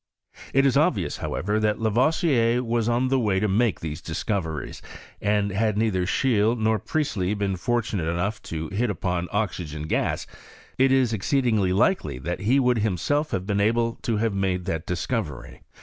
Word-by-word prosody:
It 135 Hz, +1 st, +3 dB
is 135 Hz, -, +3 dB
obvious, -, -, +1 dB
however, 105 Hz, +4 st, -1 dB
that 105 Hz, -1 st, +1 dB
Lavoisier 120 Hz, +1 st, +2 dB
was 115 Hz, -1 st, 0 dB
on 120 Hz, +2 st, +1 dB
the 135 Hz, 0 st, +2 dB
way 105 Hz, -5 st, +1 dB
to 105 Hz, -, +1 dB
make 105 Hz, +2 st, +1 dB
these 80 Hz, 0 st, -5 dB
discoveries, 80 Hz, -1 st, -3 dB, 0.4 s
and 105 Hz, -1 st, +1 dB
had 105 Hz, +2 st, 0 dB
neither 100 Hz, -5 st, +1 dB
Scheele 115 Hz, -1 st, +2 dB
nor 110 Hz, -1 st, +1 dB
Priestley 105 Hz, -9 st, -1 dB
been 100 Hz, -2 st, -1 dB
fortunate 105 Hz, -4 st, -1 dB
enough 100 Hz, +6 st, -2 dB
to 80 Hz, -1 st, -4 dB
hit 110 Hz, +5 st, 0 dB
upon 90 Hz, -2 st, -2 dB
oxygen 90 Hz, -7 st, -2 dB
gas, 80 Hz, -, -1 dB, 0.5 s
it 135 Hz, 0 st, +5 dB
is 130 Hz, -4 st, +3 dB
exceedingly 110 Hz, -3 st, +1 dB
likely 95 Hz, -, +1 dB
that 85 Hz, +8 st, -4 dB
be 120 Hz, +8 st, +3 dB
would 125 Hz, -3 st, +2 dB
himself 110 Hz, -, 0 dB
have 95 Hz, -, -2 dB
been 100 Hz, 0 st, 0 dB
able 115 Hz, +2 st, +1 dB
to 115 Hz, -2 st, -1 dB
have 110 Hz, 0 st, 0 dB
made 95 Hz, -2 st, -1 dB
that 80 Hz, 0 st, -3 dB
dis 90 Hz, -1 st, -2 dB
covery. 100 Hz, -, -4 dB
105 Hz, 170 wpm, -25 LUFS, 90-120 Hz, 0.5 s, it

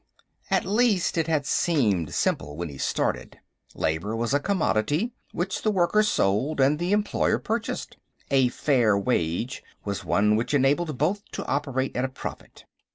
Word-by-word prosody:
At -, -, +2 dB
least, 210 Hz, -3 st, +2 dB
it 165 Hz, -1 st, 0 dB
had 155 Hz, -3 st, +1 dB
seemed 110 Hz, -, +1 dB
simple 75 Hz, +1 st, -1 dB
when 85 Hz, -1 st, -4 dB
he 70 Hz, -2 st, -10 dB
started. -, -, -1 dB, 0.4 s
Labor 85 Hz, +8 st, -1 dB
was 115 Hz, +3 st, -1 dB
a 145 Hz, -, +4 dB
commodity, 160 Hz, -, 0 dB, 0.2 s
which 190 Hz, +3 st, -2 dB
the 215 Hz, -, +1 dB
worker 195 Hz, +1 st, +3 dB
sold 140 Hz, -, +1 dB
and 140 Hz, +3 st, +3 dB
the 175 Hz, +2 st, -1 dB
employer 210 Hz, 0 st, +2 dB
purchased; 225 Hz, +1 st, -3 dB, 0.3 s
a 135 Hz, -2 st, +4 dB
"fair 120 Hz, -5 st, +2 dB
wage" 100 Hz, +2 st, -1 dB, 0.2 s
was 100 Hz, -1 st, -3 dB
one 100 Hz, +5 st, +2 dB
which 120 Hz, +6 st, 0 dB
enabled 145 Hz, +2 st, +2 dB
both 185 Hz, +9 st, 0 dB
to -, -, -4 dB
operate 135 Hz, -1 st, -1 dB
at 125 Hz, -, 0 dB
a 130 Hz, -, -1 dB
profit. 130 Hz, -, -9 dB
140 Hz, 160 wpm, -25 LUFS, 105-175 Hz, 0.4 s, a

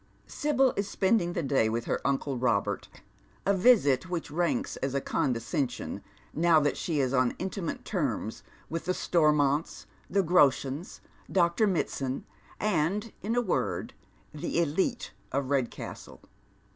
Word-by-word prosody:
Sibyl 270 Hz, -3 st, +1 dB
is 200 Hz, 0 st, -2 dB
spending 190 Hz, -3 st, +2 dB
the 170 Hz, -, -2 dB
day 135 Hz, -5 st, +2 dB
with 115 Hz, +1 st, -2 dB
her -, -, -1 dB
uncle 140 Hz, 0 st, 0 dB
Bobert, 110 Hz, -5 st, 0 dB, 0.6 s
a 200 Hz, -, +4 dB
visit 185 Hz, -, +4 dB
which 170 Hz, -4 st, -3 dB
ranks 175 Hz, -, 0 dB
as 135 Hz, 0 st, -2 dB
a -, -, +3 dB
condescension 125 Hz, +1 st, -2 dB, 0.3 s
now 165 Hz, 0 st, +4 dB
that 145 Hz, -1 st, +1 dB
she 160 Hz, -4 st, -1 dB
is 130 Hz, -1 st, +1 dB
on 130 Hz, -2 st, +3 dB
iniimate 190 Hz, -2 st, -4 dB
terms -, -, -2 dB, 0.3 s
with 165 Hz, +1 st, -4 dB
the 185 Hz, -, +1 dB
Stormonts, 150 Hz, -2 st, +2 dB, 0.2 s
the 200 Hz, -1 st, +2 dB
Groshens, 145 Hz, -2 st, +2 dB, 0.3 s
Dr. 175 Hz, +3 st, +3 dB
Mitsand, 135 Hz, -7 st, -1 dB, 0.4 s
and, 205 Hz, +2 st, 0 dB
in 225 Hz, +4 st, -1 dB
a 245 Hz, -, +3 dB
word, 215 Hz, -, -1 dB, 0.4 s
tho 150 Hz, -, -5 dB
e'litfl, 170 Hz, -, 0 dB, 0.2 s
of 135 Hz, 0 st, -1 dB
Redcastle. 130 Hz, -4 st, -3 dB
160 Hz, 135 wpm, -29 LUFS, 135-190 Hz, 0.6 s, a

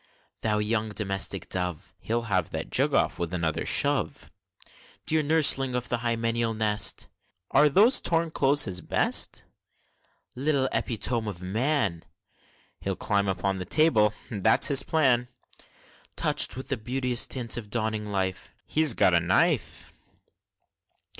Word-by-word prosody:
Thou 105 Hz, -1 st, 0 dB
young 110 Hz, +1 st, -1 dB
domestic 100 Hz, -3 st, -2 dB
dove! 90 Hz, -3 st, -4 dB
(He'll 115 Hz, +1 st, -3 dB
have 95 Hz, -7 st, -1 dB
that -, -, -6 dB
jug -, -, +2 dB
off, -, -, 0 dB
with 85 Hz, +1 st, -3 dB
another 80 Hz, -3 st, -2 dB
shove!) -, -, 0 dB, 0.7 s
Dear 155 Hz, 0 st, +2 dB
nurseling 145 Hz, -4 st, +2 dB
of 125 Hz, 0 st, -3 dB
the 120 Hz, -, 0 dB
hymeneal 115 Hz, -1 st, -1 dB
nest! 105 Hz, -1 st, 0 dB, 0.4 s
(Are 150 Hz, +2 st, +4 dB
those 210 Hz, -, +5 dB
torn 165 Hz, -1 st, 0 dB
clothes 145 Hz, 0 st, +3 dB
his 90 Hz, -2 st, -3 dB
best?) -, -, +2 dB, 0.9 s
Little 135 Hz, 0 st, 0 dB
epitome 115 Hz, -1 st, -1 dB
of 95 Hz, -4 st, -8 dB
man! 110 Hz, -, -1 dB, 0.8 s
(He'll -, -, -3 dB
climb 100 Hz, -1 st, -1 dB
upon 95 Hz, +1 st, -2 dB
the 90 Hz, -, -5 dB
table, 110 Hz, -, +2 dB, 0.2 s
that's 110 Hz, 0 st, +3 dB
his 140 Hz, -2 st, +4 dB
plan!) 130 Hz, -7 st, +1 dB, 0.9 s
Touch'd -, -, 0 dB
with 130 Hz, -, -8 dB
the 135 Hz, -, -1 dB
beauteous 125 Hz, +2 st, -1 dB
tints 120 Hz, -3 st, -3 dB
of 110 Hz, -4 st, -7 dB
dawning 110 Hz, -1 st, -2 dB
life 95 Hz, -2 st, -4 dB
(He's 155 Hz, -6 st, +3 dB
got 90 Hz, -, +3 dB
a 85 Hz, -, +4 dB
knife!) 85 Hz, +2 st, -1 dB
115 Hz, 135 wpm, -26 LUFS, 100-135 Hz, 0.9 s, those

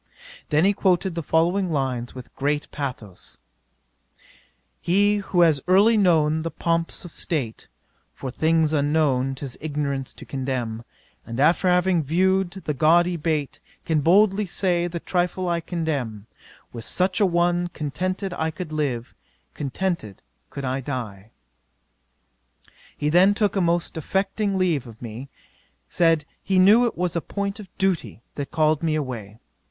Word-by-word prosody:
Then 150 Hz, +3 st, +3 dB
he 200 Hz, -, +4 dB
quoted 190 Hz, -2 st, +1 dB
the 170 Hz, -, -3 dB
following 175 Hz, +5 st, +1 dB
lines 130 Hz, -6 st, -2 dB
with 130 Hz, -1 st, -11 dB
great 145 Hz, +2 st, -1 dB
pathos: 125 Hz, -10 st, -6 dB, 1.4 s
"He 205 Hz, +4 st, +3 dB
who 190 Hz, -3 st, 0 dB
has 160 Hz, -5 st, +4 dB
early 200 Hz, +5 st, +5 dB
known 160 Hz, -6 st, +3 dB
the 165 Hz, -, -3 dB
pomps 165 Hz, +3 st, -1 dB
of 175 Hz, -, -9 dB
state, 135 Hz, -11 st, -4 dB, 0.5 s
(For 130 Hz, -, -6 dB
things 160 Hz, +2 st, +2 dB
unknown, 140 Hz, -3 st, +1 dB
'tis 135 Hz, -2 st, -7 dB
ignorance 140 Hz, -3 st, -3 dB
to -, -, -11 dB
condemn;) 130 Hz, -4 st, -3 dB, 0.4 s
And 115 Hz, +2 st, -6 dB
after 165 Hz, +6 st, +3 dB
having 180 Hz, -1 st, +3 dB
viewed 185 Hz, +5 st, +2 dB
the 175 Hz, -4 st, -5 dB
gaudy 170 Hz, +5 st, +3 dB
bait, 155 Hz, -3 st, -2 dB, 0.3 s
Can 155 Hz, -2 st, +1 dB
boldly 195 Hz, +5 st, +4 dB
say, 175 Hz, -1 st, 0 dB
the 170 Hz, 0 st, -5 dB
trifle 180 Hz, +1 st, -1 dB
I 170 Hz, -1 st, 0 dB
contemn; 140 Hz, -, -3 dB, 0.5 s
With 115 Hz, -2 st, -7 dB
such 185 Hz, +2 st, +1 dB
a -, -, +6 dB
one 175 Hz, 0 st, +1 dB
contented 185 Hz, +5 st, -3 dB
could 160 Hz, 0 st, -3 dB
I -, -, -4 dB
live, 130 Hz, -6 st, -2 dB, 0.4 s
Contented 145 Hz, -, -3 dB, 0.3 s
could 140 Hz, -, -6 dB
I 130 Hz, +1 st, -1 dB
die;" 110 Hz, -7 st, -6 dB, 1.7 s
'He 150 Hz, -, 0 dB
then 185 Hz, +5 st, +5 dB
took 210 Hz, -1 st, +1 dB
a 195 Hz, -, +2 dB
most 170 Hz, 0 st, 0 dB
affecting 195 Hz, +5 st, -1 dB
leave 165 Hz, -9 st, +1 dB
of 115 Hz, -1 st, -13 dB
me; 120 Hz, +3 st, -8 dB, 0.6 s
said, 165 Hz, -3 st, +2 dB, 0.2 s
he 190 Hz, -1 st, 0 dB
knew, 210 Hz, +6 st, +6 dB
it -, -, -5 dB
was 180 Hz, -1 st, -1 dB
a 170 Hz, -, 0 dB
point 200 Hz, +3 st, -4 dB
of 200 Hz, -3 st, -10 dB
duty 145 Hz, -, -1 dB
that 140 Hz, -1 st, -5 dB
called 155 Hz, -1 st, +2 dB
me 160 Hz, -2 st, 0 dB
away. 120 Hz, -8 st, -5 dB
160 Hz, 145 wpm, -23 LUFS, 140-185 Hz, 1.7 s, a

